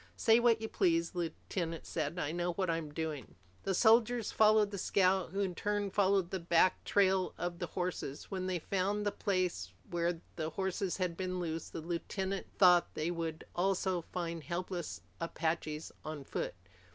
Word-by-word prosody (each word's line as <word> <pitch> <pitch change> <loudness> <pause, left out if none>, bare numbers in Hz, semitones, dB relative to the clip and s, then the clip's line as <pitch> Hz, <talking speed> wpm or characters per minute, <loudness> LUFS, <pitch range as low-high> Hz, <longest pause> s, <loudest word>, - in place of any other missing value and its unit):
"Say 225 -1 +5
what 235 -2 +4
you 220 - -3
please," 170 -4 +2
the 180 - -4
lieutenant 165 0 -3
said. 155 +1 -2
"I 150 -4 -1
know 175 +1 -1
what 185 -1 0
I'm 165 -2 -3
doing." 150 -5 -4 0.3
The 195 - +1
soldiers 230 +2 +4
followed 215 -1 +5
the 200 - -4
scout, 190 -1 +2
who 195 +4 -2
in 190 -2 0
turn 205 +1 -1
followed 195 -2 +2
the 190 - -1
back 170 +1 +3
trail 190 -2 +3
of 175 0 -3
the 175 - -2
horses. 180 -6 -4
When 185 -1 -2
they 185 -1 0
found 195 +4 -1
the 205 - +2
place 180 - -1 0.2
where 170 -1 0 0.2
the 160 -1 -1
horses 190 +1 -2
had 180 -3 -1
been 185 0 -2
loosed, 165 -2 -3
the - - -4
lieutenant 190 +3 -3
thought, 180 -2 +6
they 155 +3 -1
would 165 -2 -3
also 185 0 +1
find 170 -1 -4
helpless 175 - -4 0.2
Apaches 160 -2 -2
on 155 -2 -5
foot. - - -3
180 Hz, 175 wpm, -33 LUFS, 165-195 Hz, 0.3 s, thought